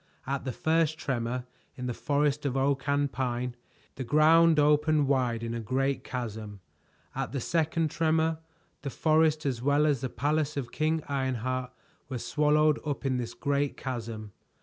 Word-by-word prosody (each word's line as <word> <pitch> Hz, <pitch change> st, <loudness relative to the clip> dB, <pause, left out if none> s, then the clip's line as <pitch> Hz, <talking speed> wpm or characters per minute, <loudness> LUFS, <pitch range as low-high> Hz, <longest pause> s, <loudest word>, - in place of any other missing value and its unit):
At 135 Hz, +1 st, -3 dB
the 130 Hz, -, -1 dB
first 160 Hz, +3 st, +1 dB
tremor, 125 Hz, -2 st, -2 dB, 0.3 s
in 125 Hz, -, -5 dB
the 125 Hz, -, -2 dB
forest 145 Hz, +2 st, 0 dB
of 135 Hz, 0 st, -1 dB
oak 135 Hz, +1 st, 0 dB
and 140 Hz, -1 st, +1 dB
pine, 125 Hz, -1 st, -2 dB, 0.4 s
the 130 Hz, -, -3 dB
ground 160 Hz, +4 st, +5 dB
opened 150 Hz, 0 st, +3 dB
wide 125 Hz, -4 st, +1 dB
in 115 Hz, 0 st, -3 dB
a 115 Hz, -, -3 dB
great 135 Hz, +4 st, -1 dB
chasm. 110 Hz, -4 st, -5 dB, 0.5 s
At -, -, -3 dB
the 140 Hz, -, -1 dB
second 160 Hz, +2 st, 0 dB
tremor, 160 Hz, 0 st, +1 dB, 0.4 s
the 140 Hz, -, -4 dB
forest 155 Hz, +1 st, +2 dB
as 125 Hz, -4 st, -1 dB
well 145 Hz, +3 st, +3 dB
as 145 Hz, -5 st, +1 dB
the 130 Hz, -, -2 dB
palace 150 Hz, +3 st, -1 dB
of 125 Hz, -4 st, -3 dB
King 155 Hz, +2 st, 0 dB
Ironheart 130 Hz, -2 st, -2 dB, 0.4 s
were 130 Hz, -, -3 dB
swallowed 150 Hz, +5 st, +2 dB
up 145 Hz, -2 st, -3 dB
in 130 Hz, -1 st, +1 dB
this 120 Hz, -1 st, -4 dB
great 140 Hz, -1 st, -1 dB
chasm. 115 Hz, -4 st, -5 dB
140 Hz, 165 wpm, -28 LUFS, 125-150 Hz, 0.5 s, ground